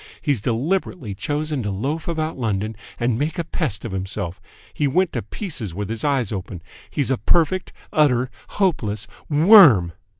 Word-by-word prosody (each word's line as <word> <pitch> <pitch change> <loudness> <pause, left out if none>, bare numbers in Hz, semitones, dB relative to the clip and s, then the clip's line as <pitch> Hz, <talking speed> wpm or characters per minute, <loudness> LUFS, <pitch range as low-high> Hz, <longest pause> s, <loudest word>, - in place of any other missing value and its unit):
He's 140 -8 0
deliberately 130 - -1
chosen 150 +5 -2
to 105 - -2
loaf 135 +12 -3
about 160 -1 -2
London 110 -3 -2 0.2
and 120 -1 +1
make 155 +5 -1
a 170 - 0
pest 150 - -3
of 115 - -4
himself. 95 -1 -4 0.3
He 145 - +1
went 180 +6 +1
to - - -1
pieces 130 - -5
with 100 0 -4
his 115 -1 -3
eyes 135 -7 +1
open. 95 -4 -6 0.3
He's 140 -2 -1
a 130 - +1
perfect, 175 +2 +1 0.2
utter, 130 -4 +3 0.2
hopeless 110 - -1 0.2
WORM!" 150 - +7
130 Hz, 160 wpm, -22 LUFS, 105-155 Hz, 0.3 s, WORM